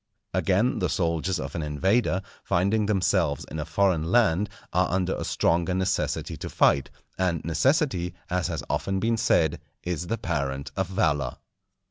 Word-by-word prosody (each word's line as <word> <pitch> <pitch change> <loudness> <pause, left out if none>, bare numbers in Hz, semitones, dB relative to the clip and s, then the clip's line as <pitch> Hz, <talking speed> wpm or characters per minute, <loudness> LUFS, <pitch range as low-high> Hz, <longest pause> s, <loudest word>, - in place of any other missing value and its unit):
Again, 100 +7 +2
the 90 - 0
soldiers 85 +1 0
of 70 0 -5
an 85 - -2
invader, 95 - +1 0.2
finding 100 +4 +1
themselves 90 -7 +1
in 80 - -4
a 75 - -3
foreign 85 0 +1
land, 100 0 +3 0.2
are - - +2
under 95 0 0
a - - -4
stronger 85 +2 +1
necessity 95 0 -1
to - - -6
fight, 70 - +3 0.3
and 90 -4 0
necessity, 90 - +1
as 90 0 0
has - - -3
often 95 0 -1
been 115 +3 +1
said, 85 -9 +2 0.2
is 90 -1 -3
the 115 - -1
parent 70 -7 -2
of 95 -2 0
valour. 75 -7 0
90 Hz, 155 wpm, -26 LUFS, 80-95 Hz, 0.3 s, land